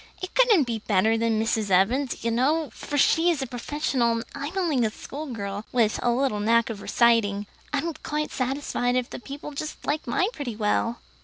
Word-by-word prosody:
It 370 - -6
couldn't 470 -10 +5
be 235 -3 -3
better 215 +1 +2
than 225 -1 +1
Mrs. 220 -2 0
Evans's, 235 +9 +2
you 230 - +1
know, 280 +4 +1
for 290 - -5
she 325 +4 +4
is 305 -6 0
a - - -2
professional, 250 -1 0
and 230 0 -2
I'm 285 +6 -5
only 315 -10 +1
a 220 - +2
schoolgirl, 215 -6 -6
with 230 -4 +2
a - - +2
little 240 -3 +1
knack 230 +2 +3
of 205 -3 -7
reciting. 215 -4 +2 0.3
I'm 320 +3 -1
quite 300 0 -2
satisfied 255 -1 -1
if 250 -1 -1
the - - -6
people 280 +3 -8
just 300 +2 -6
liked 295 -1 -1
mine 365 - +1
pretty 255 -7 -5
well." 220 +2 0
245 Hz, 190 wpm, -25 LUFS, 225-290 Hz, 0.3 s, couldn't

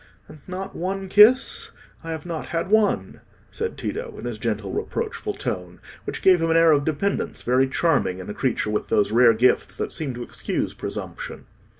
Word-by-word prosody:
"And 155 - -13
not 190 +1 -6
one 190 +2 -3
kiss? 220 +7 +5 0.3
I 165 - -7
have 160 -1 -5
not 165 -2 -5
had 170 +3 -2
one," 215 -1 +2 0.3
said 455 0 -4
Tito, 465 -1 -4
in - - -8
his - - -4
gentle - - -2
reproachful 435 -2 -3
tone, - - -5 0.3
which - - -5
gave 185 -3 +6
him 165 - +1
an 165 - +4
air 165 -1 +6
of 145 -2 +3
dependence 160 +6 -1
very 130 +2 +3
charming 135 - +1
in 95 - -8
a 105 - -4
creature 115 -4 -1
with 105 - -2
those 105 0 +2
rare 115 0 +6
gifts 125 +3 +2
that - - -3
seem 140 -6 -3
to 120 - -5
excuse - - -3
presumption. - - -6
165 Hz, 190 wpm, -23 LUFS, 130-200 Hz, 0.3 s, gave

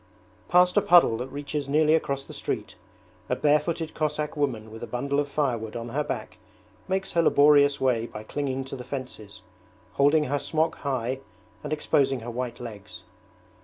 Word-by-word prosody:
Past 180 0 +5
a - - +6
puddle 175 -11 +6
that 125 +2 -4
reaches 145 0 -4
nearly 155 +2 +4
across 140 -4 0
the - - -11
street, - - -4 0.6
a - - +1
barefooted 155 +2 +1
Cossack 150 0 -2
woman 120 -7 -2
with 110 - -10
a 120 - -5
bundle 140 +3 -1
of 145 - 0
firewood 120 -7 -2
on 120 0 -5
her 150 +5 -1
back - - -5 0.5
makes 190 0 -1
her 170 - +3
laborious 145 -2 +5
way 120 -3 +1
by 105 - -8
clinging 135 +2 -3
to 135 +1 -7
the 125 - -7
fences, 125 -7 -7 0.5
holding 145 +2 +4
her 145 0 -1
smock 160 +3 0
high 130 -2 -2 0.4
and 150 - -5
exposing 135 -4 +1
her 120 +1 -6
white 120 0 -4
legs. 110 -4 -9
140 Hz, 170 wpm, -26 LUFS, 125-150 Hz, 0.6 s, a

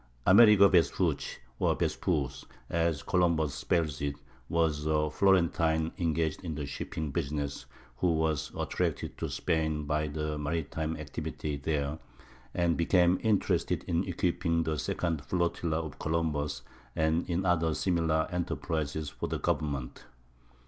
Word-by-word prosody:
Amerigo 100 +1 +8
Vespucci 85 -6 +1 0.2
(or - - +2
Vespusze, 70 -1 -1 0.3
as 85 -3 0
Columbus 85 -5 +2
spells 75 +3 -1
it) 70 0 -1 0.3
was 80 -3 +1
a 75 -1 +1
Florentine 85 -3 +2
engaged 80 0 0
in 80 -4 -4
the 75 -1 -3
shipping 75 +1 -4
business 70 -2 -3 0.3
who 85 +6 +2
was 80 -2 0
attracted - - -2
to - - -2
Spain 80 -3 0
by 75 +1 0
the 75 0 -3
maritime 80 +1 -2
activity 75 0 -4
there, 70 +1 -2 0.6
and 85 -2 +2
became 90 +1 +3
interested 110 -3 +1
in 85 +2 0
equipping 85 -2 0
the 80 -2 -2
second 80 +1 -2
flotilla 85 +1 0
of 80 -3 -7
Columbus 75 -4 -1 0.3
and 80 +3 +1
in 90 +2 0
other 80 -3 +2
similar 80 -3 +1
enterprises 80 -4 -2
for - - -4
the - - -2
government. 70 -4 -2
80 Hz, 130 wpm, -30 LUFS, 75-85 Hz, 0.6 s, Amerigo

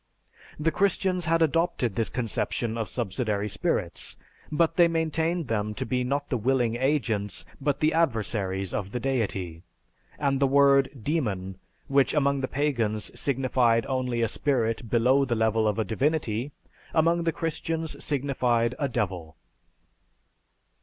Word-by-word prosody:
The 160 +2 +1
Christians 190 0 +1
had 165 0 +3
adopted 160 - +1
this 115 +2 -1
conception 115 -1 -2
of 115 -2 -3
subsidiary 105 -2 -2
spirits, 105 0 -2 0.3
but 160 +2 +2
they 175 -1 +6
maintained 165 0 0
them 105 -2 -1
to - - -3
be 125 +2 0
not 140 +3 -1
the 125 - +1
willing 120 0 +1
agents, 120 -7 -1 0.2
but 140 0 0
the 155 +1 +3
adversaries 105 - 0
of 100 -1 -3
the 125 - -1
Deity; 100 -10 -2 0.6
and 140 -2 0
the 140 - +4
word 140 0 +5
demon, 100 - -2 0.3
which 135 0 +2
among 140 -2 +2
the 130 - -1
pagans, 120 -8 -1
signified 125 -4 +2
only 125 -3 -1
a - - +2
spirit 115 -3 -1
below 125 +4 +4
the 120 -3 0
level 110 0 +2
of 105 - 0
a 110 - 0
Divinity, 130 -1 -1 0.4
among 165 +1 +3
the 165 - +1
Christians 165 0 -3
signified 125 -4 +1
a 140 -2 0
devil." 90 -8 -3
130 Hz, 140 wpm, -27 LUFS, 110-150 Hz, 0.6 s, they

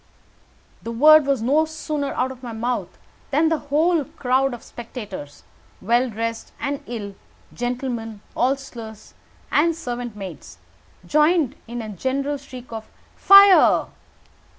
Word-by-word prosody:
The 230 - -6
word 300 +5 +6
was 270 -5 +1
no 295 +6 +3
sooner 305 -2 -4
out 260 +1 0
of 255 -1 -11
my 240 -3 -7
mouth 240 +2 -3 0.3
than 310 +3 +2
the 320 -2 0
whole 320 +2 +2
crowd 265 +1 0
of 240 -2 -8
spectators, 210 - -9 0.4
well 240 +5 +1
dressed 230 +1 -4
and 280 0 -3
ill 210 -4 -6 0.4
gentlemen, 240 -3 -4
hostlers, 240 -4 -3 0.4
and 330 +2 +3
servant 245 -7 -5
maids 180 - -9 0.5
joined 305 - +2
in 235 0 -5
a 215 - -7
general 270 +8 -2
shriek 255 -3 -12
of 220 -1 -7 0.3
"Fire!" 395 -1 +7
250 Hz, 130 wpm, -22 LUFS, 230-290 Hz, 0.5 s, Fire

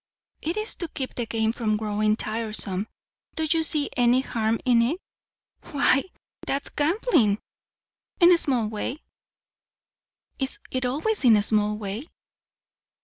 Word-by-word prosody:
"It 330 +6 -2
is 430 +1 -2
to 340 - -2
keep 265 -4 -4
the 240 -2 -3
game 220 0 +1
from 215 -3 0
growing 215 0 +1
tiresome. 215 -3 -3 0.5
Do 320 - 0
you 325 +1 +2
see 305 -2 +2
any 245 +1 +4
harm 225 -3 -1
in 240 -2 +5
it?" 255 +9 +1 0.8
"Why, 275 -1 +3 0.4
that's 275 +1 -1
gambling." 295 - +2 0.8
"In 350 0 +7
a 350 - +7
small 250 -8 +1
way." 220 +7 -4 1.4
"Is 265 -1 -2
it 255 -1 0
always 310 - -1
in 235 -4 +7
a 205 - +2
small 210 0 +2
way?" 215 +7 -5
245 Hz, 140 wpm, -25 LUFS, 215-295 Hz, 1.4 s, In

